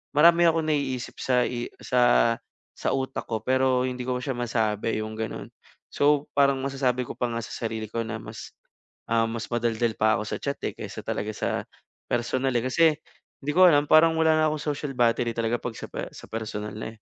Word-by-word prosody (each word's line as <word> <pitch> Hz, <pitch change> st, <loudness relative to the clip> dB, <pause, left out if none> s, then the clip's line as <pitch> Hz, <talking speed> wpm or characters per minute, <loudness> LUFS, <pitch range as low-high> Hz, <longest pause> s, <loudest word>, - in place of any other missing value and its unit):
marami 170 Hz, +3 st, +6 dB
akong 165 Hz, -1 st, +2 dB
naiisip 140 Hz, -5 st, -1 dB
sa 125 Hz, -1 st, +2 dB
i 120 Hz, -1 st, -3 dB
sa 120 Hz, -2 st, +4 dB, 0.4 s
sa -, -, -2 dB
utak 135 Hz, 0 st, -3 dB
ko 110 Hz, -1 st, -2 dB
pero 130 Hz, -1 st, +2 dB
hindi 125 Hz, -1 st, -3 dB
ko 125 Hz, -1 st, 0 dB
siya 130 Hz, +1 st, -3 dB
masabi 115 Hz, -3 st, -1 dB
yung 110 Hz, -, -6 dB
gano'n. 110 Hz, -1 st, -4 dB, 0.5 s
So, 145 Hz, 0 st, +3 dB
parang 140 Hz, -1 st, +4 dB
masasabi 130 Hz, -2 st, 0 dB
ko -, -, -6 dB
pa 120 Hz, -, -2 dB
nga 115 Hz, -, -3 dB
sa -, -, -9 dB
sarili 110 Hz, -1 st, -3 dB
ko 115 Hz, +2 st, -3 dB
na 115 Hz, 0 st, -4 dB
mas -, -, -9 dB, 0.6 s
ah, 115 Hz, 0 st, +3 dB
mas 115 Hz, 0 st, -5 dB
madaldal 120 Hz, -1 st, 0 dB
pa 110 Hz, 0 st, +3 dB
ako 105 Hz, -, -2 dB
sa -, -, -2 dB
chat 140 Hz, 0 st, -3 dB
eh, -, -, -10 dB
kaysa -, -, -7 dB
talaga 105 Hz, +1 st, -3 dB
sa -, -, -2 dB, 0.6 s
personal 130 Hz, +2 st, 0 dB
eh, 120 Hz, -, +2 dB
kasi 165 Hz, +6 st, +2 dB, 0.6 s
hindi 145 Hz, +1 st, -2 dB
ko 185 Hz, -, +9 dB
alam 145 Hz, -4 st, +5 dB
parang 160 Hz, +1 st, +6 dB
wala 160 Hz, -1 st, +4 dB
na 155 Hz, -, +3 dB
akong 150 Hz, -1 st, -3 dB
social 140 Hz, -1 st, -4 dB
battery 120 Hz, -1 st, +2 dB
talaga 115 Hz, +1 st, 0 dB
'pag 120 Hz, -1 st, -5 dB
sa -, -, -7 dB
pe -, -, -4 dB
sa -, -, -12 dB
personal 110 Hz, -1 st, -5 dB
na 110 Hz, +1 st, -6 dB
eh. -, -, -26 dB
125 Hz, 205 wpm, -26 LUFS, 115-140 Hz, 0.6 s, ko